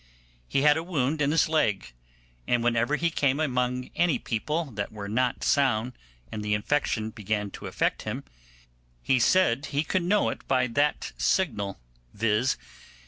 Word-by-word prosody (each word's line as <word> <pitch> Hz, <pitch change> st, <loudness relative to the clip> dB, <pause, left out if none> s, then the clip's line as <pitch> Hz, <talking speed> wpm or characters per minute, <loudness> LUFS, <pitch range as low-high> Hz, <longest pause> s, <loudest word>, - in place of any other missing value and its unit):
He 135 Hz, -, +1 dB
had 150 Hz, 0 st, +6 dB
a 160 Hz, -, -2 dB
wound 155 Hz, -3 st, -1 dB
in 140 Hz, -, +2 dB
his 160 Hz, +2 st, +3 dB
leg, 105 Hz, -, 0 dB, 0.5 s
and 120 Hz, -1 st, +2 dB
whenever 120 Hz, +4 st, +2 dB
he 170 Hz, +3 st, 0 dB
came 140 Hz, -3 st, +1 dB
among 125 Hz, -3 st, -1 dB
any 175 Hz, -3 st, +2 dB
people 150 Hz, +9 st, -2 dB
that 100 Hz, -2 st, -4 dB
were 105 Hz, -2 st, -7 dB
not 125 Hz, +4 st, 0 dB
sound, 125 Hz, -3 st, +2 dB, 0.4 s
and 105 Hz, -, -4 dB
the 105 Hz, 0 st, +1 dB
infection 110 Hz, -1 st, -1 dB
began 105 Hz, -2 st, -3 dB
to -, -, -8 dB
affect -, -, -1 dB
him, -, -, -4 dB, 0.8 s
he 130 Hz, -, +3 dB
said 140 Hz, -1 st, +3 dB
he 145 Hz, +1 st, 0 dB
could 185 Hz, +4 st, 0 dB
know 200 Hz, +4 st, +2 dB
it -, -, -7 dB
by 130 Hz, -2 st, +2 dB
that 145 Hz, +5 st, 0 dB
signal, 105 Hz, -, 0 dB, 0.4 s
viz. 110 Hz, +4 st, +1 dB
125 Hz, 160 wpm, -27 LUFS, 110-150 Hz, 0.8 s, had